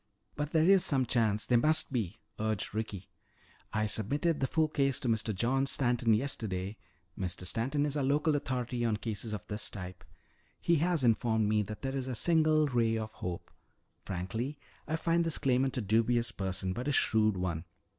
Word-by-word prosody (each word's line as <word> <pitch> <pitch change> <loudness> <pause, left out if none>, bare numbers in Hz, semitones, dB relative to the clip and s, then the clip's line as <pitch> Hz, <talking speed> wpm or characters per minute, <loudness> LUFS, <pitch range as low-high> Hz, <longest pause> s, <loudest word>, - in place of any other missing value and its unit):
"But 150 0 -3
there 160 0 +3
is 195 -2 +6
some 135 -3 +1
chance, 110 -4 +2
there 120 -2 +4
must 155 +1 +3
be!" 110 -5 -2 0.2
urged 110 -2 -2
Ricky. 105 -4 -4 0.6
"I 110 0 0
submitted 145 - 0
the 135 - +1
full 160 +2 +2
case 140 -3 +1
to - - -2
Mr. 110 -1 +1
John 130 +7 +1
Stanton 120 -4 +3
yesterday 105 -5 -2 0.4
Mr. 90 -1 -4
Stanton 135 +9 0
is 145 -1 -2
our 145 - 0
local 150 +3 +2
authority 125 -3 -2
on 115 -2 +1
cases 110 0 -4
of 105 -3 -5
this 105 0 -3
type. 90 -2 -8 0.6
He 170 -1 +2
has 165 -1 +1
informed 110 -2 +2
me 105 0 +2
that 105 +3 -7
there 135 0 -2
is 130 -1 -3
a 130 - -3
single 155 +3 +3
ray 115 -5 +1
of 110 0 -4
hope. 90 -1 -6 0.5
Frankly, 110 +10 -4 0.3
I 160 - 0
find 165 +1 +1
this 165 -2 +2
claimant 130 0 +1
a - - 0
dubious 115 +2 +2
person, 95 -2 -2
but 125 +7 -4
a - - +2
shrewd 110 -6 +2
one. 85 -2 -2
120 Hz, 185 wpm, -31 LUFS, 105-140 Hz, 0.6 s, is